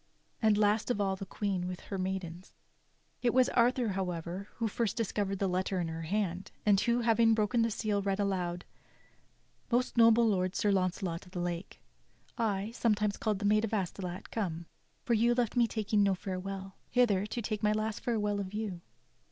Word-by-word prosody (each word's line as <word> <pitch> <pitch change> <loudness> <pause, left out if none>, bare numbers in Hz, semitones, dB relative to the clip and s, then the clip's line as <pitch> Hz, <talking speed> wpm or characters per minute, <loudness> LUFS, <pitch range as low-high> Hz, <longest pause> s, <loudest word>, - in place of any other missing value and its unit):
And 215 -2 +4
last 210 +2 +2
of 245 - 0
all 195 -1 +1
the 190 0 -7
Queen 190 -3 -2
with 180 -1 -5
her 195 - -5
maidens. 185 -1 -4 0.7
It 240 -1 +1
was 255 -1 +5
Arthur, 245 -1 +2
however, 185 0 -3
who 230 - -1
first 220 0 -1
discovered 205 -3 -1
the 195 - 0
letter 185 +1 -1
in 170 -2 -1
her 160 0 -5
hand, 185 +1 -2 0.2
and 205 -2 +5
who, 240 0 +2
having 230 -1 +4
broken 220 +2 +2
the 230 - +2
seal 210 -2 -1
read 195 0 -1
aloud: 180 -3 -1 1.1
"Most 245 +1 +1
noble 230 0 +6
lord, 185 -3 +1
Sir 205 - +2
Launcelot 185 -2 -1
of 180 - -17
the 180 - -3
Lake, 175 +1 -4 0.5
I, 210 -2 -1
sometimes 210 -3 +1
call'd 215 -2 -1
the 205 - -4
Maid 215 +1 +4
of 225 0 -1
Astolat, 185 -1 -4
Come, 170 -6 -3 0.4
for 240 - +1
you 235 +2 +3
left 240 -3 0
me 240 -1 +4
taking 215 -2 0
no 200 -1 +3
fdrewell, 190 +1 -5 0.2
Hither, 210 -6 +3
to 225 - -4
take 215 -2 -3
my 210 - +3
last 215 0 -1
farewell 210 -4 0
of 195 0 -5
you. 205 -5 -3
205 Hz, 185 wpm, -31 LUFS, 185-220 Hz, 1.1 s, noble